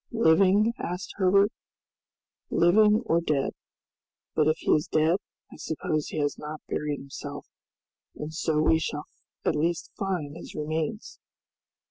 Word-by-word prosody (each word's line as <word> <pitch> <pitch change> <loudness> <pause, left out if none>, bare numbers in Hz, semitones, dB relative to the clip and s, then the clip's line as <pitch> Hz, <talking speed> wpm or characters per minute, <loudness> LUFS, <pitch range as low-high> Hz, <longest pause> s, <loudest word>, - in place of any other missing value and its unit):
"Living?" 205 +1 +4
asked 180 +2 -4
Herbert. 200 +2 +4 1.0
"Living 210 +6 +4
or 170 -5 +2
dead. 150 -5 0 0.8
But 155 -1 +3
if 155 +1 +3
he - - -1
is 150 - +3
dead, 160 +3 +3 0.4
I - - -11
suppose 155 -1 -2
he - - -6
has 145 -1 -1
not 150 +1 -6
buried 150 -1 -2
himself, 135 0 -8 0.7
and 150 +1 -6
so 155 -1 0
we 160 +1 +4
shall 150 -2 -3 0.4
at - - +2
least 165 +3 -1
find 175 -7 -2
his 170 - -10
remains!" 155 +7 -3
160 Hz, 135 wpm, -27 LUFS, 150-190 Hz, 1.0 s, Living